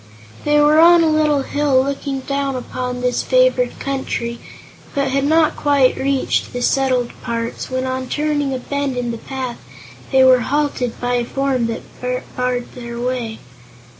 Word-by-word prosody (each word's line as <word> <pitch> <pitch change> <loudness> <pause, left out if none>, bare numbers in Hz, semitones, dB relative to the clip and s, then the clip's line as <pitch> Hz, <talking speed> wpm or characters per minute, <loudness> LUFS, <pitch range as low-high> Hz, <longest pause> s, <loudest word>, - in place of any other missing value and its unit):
They 295 0 +4
were 300 +1 +5
on 340 +1 +7
a 320 - +3
little 300 -2 +2
hill 280 -2 +2
looking 275 0 -3
down 275 0 -2
upon 250 0 -4
this 250 0 0
favored - - +2
country, 240 -3 -3 0.6
but 275 -1 +1
had 275 +1 0
not 315 +1 +3
quite 280 -3 +3
reached 275 -1 0
the 245 0 -3
settled 255 -3 +1
parts, 230 0 -4
when 255 0 -2
on 260 0 -3
turning 295 -2 0
a 260 - -1
bend 280 0 -3
in 240 -1 -2
the 230 - -6
path 260 -1 -5 0.5
they 265 -1 +5
were 260 -1 +6
halted 260 -2 -1
by 245 0 0
a 240 - 0
form 265 -1 -1
that 230 - -4 0.5
barred 250 -1 -2
their 235 -1 -7
way. 240 -3 -2
265 Hz, 165 wpm, -19 LUFS, 245-285 Hz, 0.6 s, on